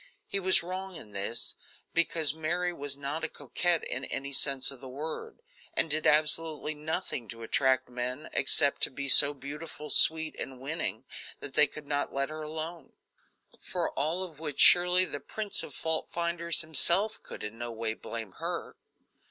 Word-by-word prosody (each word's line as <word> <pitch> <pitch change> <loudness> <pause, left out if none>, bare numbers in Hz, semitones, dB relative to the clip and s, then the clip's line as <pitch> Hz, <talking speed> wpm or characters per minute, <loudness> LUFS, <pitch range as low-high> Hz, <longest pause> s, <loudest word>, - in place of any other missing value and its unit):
He 200 - -3
was 185 -2 +3
wrong 185 +1 -6
in 110 -10 -11
this, 100 +4 +4 0.4
because 165 -3 +2
Mary 175 +3 -2
was 140 -3 -5
not 145 +3 -5
a 155 - 0
coquette 175 -2 -2
in 130 - -5
any 140 +1 -6
sense 135 -1 +3
of 135 -2 -12
the 130 - -10
word, 160 - -7 0.3
and 160 - 0
did 155 +1 0
absolutely 155 0 +1
nothing 150 -5 -5
to 115 +1 -10
attract 130 +2 +1
men, 125 +4 -6
except 140 +1 +2
to - - +3
be 140 +1 -7
so 140 +1 +10
beautiful, 150 +2 -9
sweet 160 -1 +3
and 130 -1 -7
winning 150 +6 -4 0.3
that 140 - -6
they 150 0 +5
could 155 - -12
not 145 0 -2
let 140 +1 -2
her 155 0 -7
alone; 155 0 -7 0.7
for - - -4
all 160 +6 -2
of 165 -5 -10
which 150 -3 -6
surely 180 +1 +8
the - - -6
prince 210 -2 -3
of 145 - -10
fault 160 -1 -2
finders 170 0 -1
himself 170 +7 +3
could - - -10
in 105 +2 -8
no 120 0 -5
way 115 -1 -4
blame 110 -2 -8
her. - - -5
150 Hz, 175 wpm, -28 LUFS, 135-170 Hz, 0.7 s, so